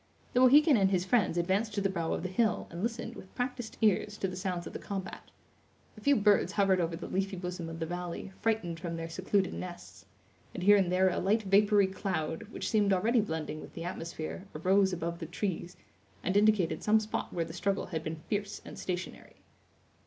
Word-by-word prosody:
The 250 - +3
Mohican 280 +2 +7
and 195 -2 +4
his 185 -2 +1
friends 210 -5 +2
advanced 195 +5 0
to - - +1
the 195 - +2
brow 170 -4 -2
of - - -2
the - - -1
hill, 220 +4 +1
and 170 +1 -6
listened, 230 +1 -3
with 190 - -12
practised 245 -2 -3
ears, 210 0 +2
to 195 - -1
the 185 - -5
sounds 180 -2 -3
of - - -8
the - - -5
combat. 195 -2 -6 0.7
A 215 - -13
few 285 +5 +4
birds 205 -3 +3
hovered 195 -3 +3
over 165 0 -1
the 165 - -7
leafy 195 +1 -2
bosom 180 -2 -5
of 165 - -6
the 165 - -1
valley, 175 +2 -5
frightened 200 -7 0
from 170 -1 -4
their 165 0 -5
secluded 190 +2 0
nests; 175 -1 -8 0.5
and 180 - -4
here 205 +2 +7
and 190 -3 +2
there 185 +1 +4
a 180 - -1
light 215 +4 +2
vapory 200 +1 +4
cloud, 190 0 -3
which - - -5
seemed 210 -3 +3
already 220 +6 +3
blending 160 -5 -4
with - - -12
the 165 - -5
atmosphere, 170 +1 -5
arose 190 +4 +3
above 170 -1 -3
the 165 - -5
trees, 180 0 -3 0.5
and 185 - -1
indicated 205 -4 +3
some 215 +1 +4
spot 215 0 -3
where 170 -1 -1
the 165 - -9
struggle 195 +2 -1
had 160 - -4
been 155 0 -5
fierce 205 -1 -2
and - - -9
stationary. 180 0 -5
190 Hz, 210 wpm, -31 LUFS, 175-210 Hz, 0.7 s, Mohican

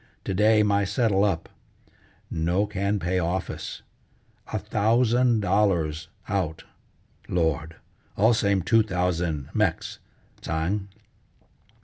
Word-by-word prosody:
To - - -3
day 105 +2 +4
my 100 -1 +2
settle 100 -1 +1
up; 95 -6 0 0.8
no 85 +5 +1
can 100 +1 -1
pay 90 0 -1
office. 90 +2 -3 0.7
A 110 - -1
thousand 115 +3 +2
dollars 90 -5 +1 0.2
out! 90 -6 -2 0.7
Lord! 80 -2 0 0.4
All 110 +4 +5
same 100 -4 +1
two 115 +5 +4
thousand 90 -7 -1
Mex', - - -1 0.4
Tsang!" 90 +5 -2
95 Hz, 100 wpm, -25 LUFS, 85-105 Hz, 0.8 s, All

